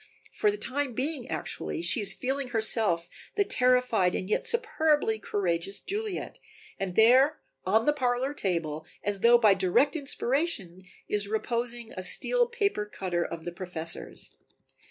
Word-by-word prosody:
For 425 - +1
the 415 - -2
time 275 -5 -2
being 260 +1 -2
actually 335 - -3
she 255 - +2
is 205 - +3
feeling 270 +1 -2
herself 220 -7 +1 0.3
the 405 - +3
terrified 250 - +2
and 185 - -3
yet 210 - -1
superbly 315 - +1
courageous 195 -2 -2
Juliet, 415 -1 -4 0.4
and 185 -2 -3
there 260 +7 +5 0.3
on 220 +4 +3
the 295 - +4
parlor 260 0 0
table, 165 - -3 0.2
as 205 -1 -2
though 235 +3 +6
by 215 -4 +5
direct 190 - +2
inspiration, 275 - -2 0.3
is 205 -1 +1
reposing 235 +2 -2
a 185 - -5
steel 485 - +3
paper 405 - -1
cutter 180 -4 -2
of 165 -1 -7
the 175 - -3
Professor's. 175 -2 -6
235 Hz, 145 wpm, -28 LUFS, 190-285 Hz, 0.4 s, though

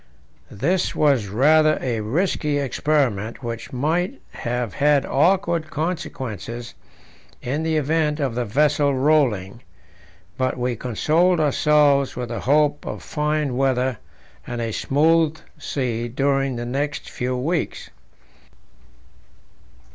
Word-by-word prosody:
This 170 - 0
was 135 -8 +2
rather 155 +8 +4
a 120 -3 -2
risky 150 - 0
experiment, 135 -5 -1
which 115 -1 -5
might 170 - -1
have 120 -3 -3
had 145 +4 +3
awkward 170 +1 +1
consequences 130 - -4 0.7
in 140 +5 -3
the 160 -1 0
event 150 +1 0
of 135 -5 -1
the 125 +1 -1
vessel 140 +4 +2
rolling; 130 -8 +1 0.8
but 130 0 0
we 125 0 -1
consoled 160 - +1
ourselves 145 -2 +3
with 125 -1 -4
the 115 - -4
hope 145 +2 +2
of - - -6
fine 150 -3 -1
weather 130 -2 0 0.5
and 120 -1 -4
a 115 -1 -2
smooth 160 +6 +2 0.2
sea 120 -4 -2
during 135 +1 0
the 120 0 -4
next 140 +4 -3
few 125 +1 -3
weeks. 160 +6 -2
140 Hz, 115 wpm, -22 LUFS, 120-155 Hz, 0.8 s, rather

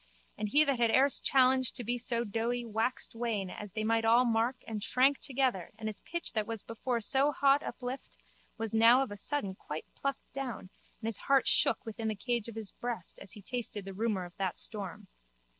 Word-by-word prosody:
And 210 0 -3
he 295 +7 +5
that 275 -4 0
had 235 -1 +4
erst 265 +4 +3
challenged 260 -1 +4
to 245 - -5
be 240 +2 -1
so 235 -1 0
doughty 235 +3 -1
waxed 225 +3 -1
wan 225 -5 -2
as 210 -2 -8
they 215 0 -2
might 225 +1 +2
all 235 +3 +5
mark 230 +2 +2
and 215 -2 -4
shrank 265 +4 +3
together 260 - 0
and 220 0 -5
his 215 -2 -4
pitch 340 0 -5
that 215 -2 0
was 225 -2 -5
before 235 +2 -2
so 275 +6 +3
haught 280 0 +4
uplift 255 +1 -6 0.4
was 225 -1 -3
now 230 +4 +6
of 260 - -6
a - - -5
sudden 205 -2 +2
quite 155 -4 -7
plucked 275 -1 -4
down 250 -8 -5 0.3
and 220 - -3
his 225 -3 -1
heart 275 -1 +3
shook 195 0 +3
within 225 0 -4
the 215 - -1
cage 235 +2 -2
of 230 - -8
his 220 -3 -4
breast 235 -8 -5
as 185 - -3
he 205 - -11
tasted 225 -4 -4
the 195 - -6
rumour 205 -2 -1
of 175 - -13
that 190 -3 -2
storm. 205 -1 -6
230 Hz, 210 wpm, -32 LUFS, 210-255 Hz, 0.4 s, now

